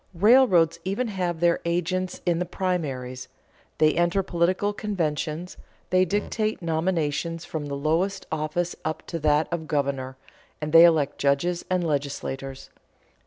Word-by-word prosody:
Railroads 185 - +5
even 205 +6 -1
have 180 -4 -2
their 170 -1 +3
agents 180 +2 -1
in 170 -2 +1
the 180 - -1
primaries, 140 -10 -3 0.5
they 155 0 +4
enter 175 +3 +1
political 185 +3 0
conventions, 170 -4 -3 0.3
they 185 0 +4
dictate 215 +3 -1
nominations 165 -1 -1
from 150 -2 -5
the 140 - -4
lowest 165 +7 0
office 160 +3 -2
up 155 0 -4
to 165 - -4
that 150 0 +2
of 160 -2 -3
governor, 135 -3 -2 0.4
and 150 0 -4
they 165 +1 +10
elect 160 -5 +2
judges 155 +5 +1
and 180 -1 +1
legislators. 135 -2 -4
170 Hz, 135 wpm, -25 LUFS, 150-185 Hz, 0.5 s, they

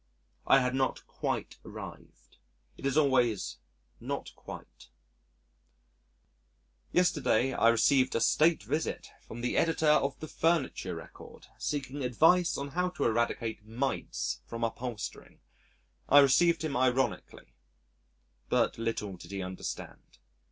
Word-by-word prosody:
I 135 - +6
had 125 0 0
not 130 0 -1
quite - - -4
arrived. - - -11 0.4
It 140 - -4
is 135 +2 0
always 120 - +2 0.4
not - - -5
quite. - - -11 2.0
Yesterday, 135 -8 +2
I 115 - +4
received 130 +3 +3
a - - +2
state 160 +7 +3
visit 155 - -3 0.2
from 120 - -8
the 125 - -1
Editor 165 -1 +1
of 140 -2 +1
the 155 - -6
Furniture 165 -2 0
Record - - -12
seeking 140 -1 -3
advice 165 +8 +3
on 140 0 -4
how 180 +4 0
to 180 - -4
eradicate 115 -1 -1
mites 110 - -3
from 115 0 -5
upholstering! 115 -1 -5 0.7
I 145 - +7
received 155 +5 +5
him 155 -3 -2
ironically 125 -5 -1 1.0
but - - +1
little 105 -4 -3
did - - -12
he 100 -1 -4
understand. 90 0 -7
130 Hz, 120 wpm, -30 LUFS, 115-150 Hz, 2.0 s, I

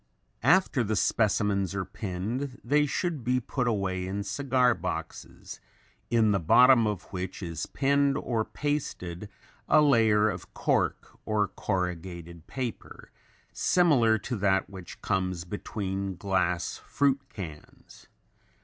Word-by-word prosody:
After 145 - +3
the 110 0 -1
specimens 100 -3 +1
are 95 -1 -2
pinned 110 +7 -4
they 150 +4 +2
should 155 -1 -2
be 125 +2 +1
put 125 +1 -2
away 95 -4 -1
in 100 +2 -3
cigar 130 0 +2
boxes - - -6 0.5
in 115 -2 +3
the 100 - +2
bottom 120 +7 +6
of 105 -4 -3
which 95 +1 -5
is 85 -2 -4
pinned 140 0 +2
or 115 -6 -1
pasted 105 - -4 0.4
a 155 - +6
layer 110 -7 +4
of 90 -4 -5
cork - - -1
or 105 -2 0
corrugated 85 -4 -4
paper 125 -4 -6 0.4
similar 135 -11 +3
to 125 +3 -4
that 95 -1 +2
which 95 -3 -10
comes 90 -3 -1
between 95 0 -4
glass 90 -2 -1
fruit 140 -1 +1
cans. 80 -7 -10
105 Hz, 120 wpm, -28 LUFS, 95-130 Hz, 0.5 s, bottom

